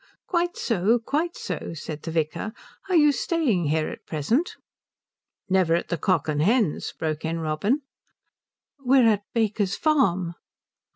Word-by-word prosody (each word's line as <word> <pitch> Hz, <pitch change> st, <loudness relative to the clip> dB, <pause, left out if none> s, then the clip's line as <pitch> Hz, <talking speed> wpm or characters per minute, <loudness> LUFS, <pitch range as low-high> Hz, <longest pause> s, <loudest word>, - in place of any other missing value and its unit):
"Quite 350 Hz, -1 st, 0 dB
so, 225 Hz, +1 st, +2 dB
quite 305 Hz, +9 st, -2 dB
so," -, -, -5 dB
said 155 Hz, -1 st, -6 dB
the -, -, -6 dB
vicar. 160 Hz, +6 st, -2 dB, 0.4 s
"Are 370 Hz, -, +2 dB
you 295 Hz, -3 st, +6 dB
staying 280 Hz, -, 0 dB
here 155 Hz, +1 st, +1 dB
at -, -, -10 dB
present?" 225 Hz, -, 0 dB, 0.9 s
"Never 185 Hz, -3 st, +3 dB
at 170 Hz, -, -2 dB
the 170 Hz, -, -1 dB
Cock 185 Hz, +2 st, +1 dB
and 150 Hz, -1 st, 0 dB
Hens?" 210 Hz, -, +1 dB
broke 155 Hz, -1 st, -3 dB
in 165 Hz, +1 st, -2 dB
Robin. 165 Hz, -, 0 dB, 1.0 s
"We're 255 Hz, -2 st, +5 dB
at 210 Hz, -2 st, +3 dB
Baker's 210 Hz, -3 st, +1 dB
Farm." 190 Hz, -, +2 dB
200 Hz, 140 wpm, -25 LUFS, 165-265 Hz, 1.0 s, you